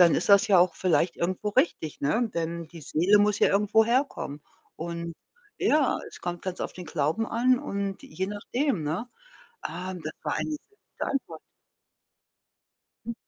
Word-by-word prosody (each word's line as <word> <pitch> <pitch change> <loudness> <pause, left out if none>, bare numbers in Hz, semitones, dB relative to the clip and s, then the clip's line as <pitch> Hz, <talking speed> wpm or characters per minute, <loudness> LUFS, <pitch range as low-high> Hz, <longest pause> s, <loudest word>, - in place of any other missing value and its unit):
dann 170 -2 +7
ist - - +2
das 200 -1 +7
ja 195 -3 +6
auch 180 +1 +4
vielleicht 180 -1 +1
irgendwo 185 +4 -1
richtig, 205 - 0
ne? 220 +12 +1
Denn 170 0 -3
die 165 +1 -11
Seele 175 +8 +3
muss 205 0 +3
ja - - +6
irgendwo 210 +2 +4
herkommen. 235 - 0 0.3
Und, 170 0 -5 0.5
ja, 295 -4 +3
es - - -11
kommt 175 -1 -3
ganz 185 -1 -5
auf - - -4
den 180 -1 -9
Glauben 155 +8 0
an 250 +2 +3
und 200 -4 -3
je 185 +5 -4
nachdem, 210 - -1
ne? 160 +10 -2 0.6
Ah, 180 +3 -5
das 155 -4 -6
war - - -1
eine - - -2
sehr 300 - -6 0.3
gute - - -2
Antwort. 275 -1 -3 1.7
Hm. 235 - -3
185 Hz, 165 wpm, -27 LUFS, 170-225 Hz, 1.7 s, dann